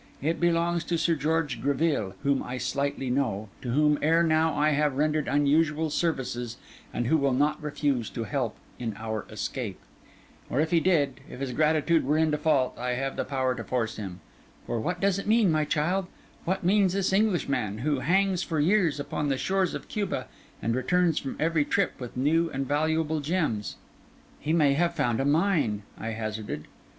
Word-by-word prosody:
It 160 +4 -1
belongs 170 0 +1
to 170 - 0
Sir 165 +1 +2
George 155 -2 -1
Greville, 140 - 0
whom 140 -1 +2
I 125 +1 -5
slightly 135 0 -2
know, 110 -6 -1
to 125 - -5
whom 150 +3 +3
ere 165 +2 +4
now 160 0 +3
I 150 +1 +3
have 145 -2 +1
rendered 150 0 +1
unusual 150 +2 +2
services, 125 -8 -2 0.3
and 120 - -2
who 160 +7 +3
will 140 -3 +1
not 150 +4 +1
refuse 145 -5 -1
to 115 - -2
help 120 0 -2 0.2
in 115 -4 -3
our 110 -1 -4
escape. - - -4 0.7
Or 130 - 0
if 160 +1 +1
he 170 - +5
did, 155 -7 +1
if - - -9
his 135 -2 -3
gratitude 155 +4 +2
were 150 +4 +1
in 160 -1 +3
default, 150 -3 +1
I 125 0 -1
have 135 +2 -2
the - - -1
power 130 -2 0
to - - -6
force 115 -3 -2
him. 95 -4 -6 0.4
For 120 - -2
what 175 +11 -2
does 195 -1 +2
it 200 - -6
mean, 215 -4 +4
my 155 -1 +2
child—what 180 +3 -2
means 190 0 +3
this 195 -1 0
Englishman, 140 - +1
who 140 +4 0
hangs 190 +4 +2
for 160 -2 -2
years 170 -2 +3
upon 145 +1 -2
the 135 - +1
shores 190 +7 0
of - - -7
Cuba, 205 -3 -2 0.4
and 115 - +1
returns 170 +5 +2
from 135 - -5
every 160 -1 +2
trip 195 +5 0
with 125 -1 -7
new 165 +5 +2
and 135 -2 -3
valuable 160 +2 +1
gems?' 145 - -1 0.6
'He 150 - -2
may 150 -4 +4
have 170 +3 +1
found 120 -8 +1
a 135 - +1
mine,' 145 - +2
I 110 - -7
hazarded. 110 -7 -4
150 Hz, 185 wpm, -27 LUFS, 130-165 Hz, 0.7 s, he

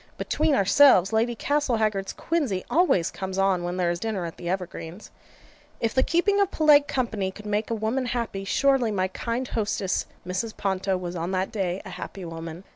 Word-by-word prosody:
Between 310 -1 +1
ourselves, 200 -1 +5
Lady 230 +2 +1
Castlehaggard's 220 -8 0
quinsy 275 - -1
always 320 - +3
comes 190 0 -5
on 195 -2 +2
when 175 +1 -3
there 175 -2 +1
is 170 - -3
dinner 210 -5 -2
at 165 - -6
the 175 - -5
Evergreens. 180 0 -5 0.7
If 225 -1 -1
the 260 - +3
keeping 400 +7 +2
of 400 - +2
polite 295 -4 +5
company 220 -7 -1
could 210 +2 -11
make 210 +1 -1
a 230 - 0
woman 225 +4 -1
happy, 230 -5 -3
surely 270 +3 +2
my 190 -3 0
kind 235 +6 -3
hostess 205 -3 -1 0.2
Mrs. 185 +5 -3
Ponto 190 -1 0
was 180 -1 -5
on 170 +1 -3
that 185 +1 -1
day 190 -3 -2
a 190 - -8
happy 180 +1 -7
woman. 165 +1 -7
205 Hz, 185 wpm, -25 LUFS, 185-245 Hz, 0.7 s, ourselves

